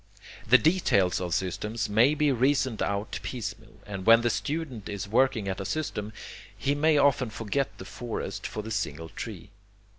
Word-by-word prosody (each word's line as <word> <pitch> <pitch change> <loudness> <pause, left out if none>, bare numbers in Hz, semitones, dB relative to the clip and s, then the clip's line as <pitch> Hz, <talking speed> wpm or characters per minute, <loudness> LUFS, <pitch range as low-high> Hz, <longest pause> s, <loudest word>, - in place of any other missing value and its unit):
The 130 - +8
details 130 - +2
of 90 -1 -3
systems 105 +5 -2
may 120 +8 +4
be 150 -1 +2
reasoned 130 -2 +1
out 100 +1 -2
piecemeal, 110 -2 -6
and 100 -2 -6
when 115 +2 +7
the 120 0 +1
student 140 -9 -3
is 100 -1 -4
working 115 -2 +2
at 95 0 -2
a - - -3
system, 105 -3 -3 0.5
he 140 +1 0
may 150 +1 +3
often 140 -4 +3
forget 115 +6 -2
the - - -9
forest 120 -2 -5
for 105 - -5
the 110 - -7
single 80 -6 -3
tree. 100 0 -8
115 Hz, 170 wpm, -28 LUFS, 100-135 Hz, 0.5 s, The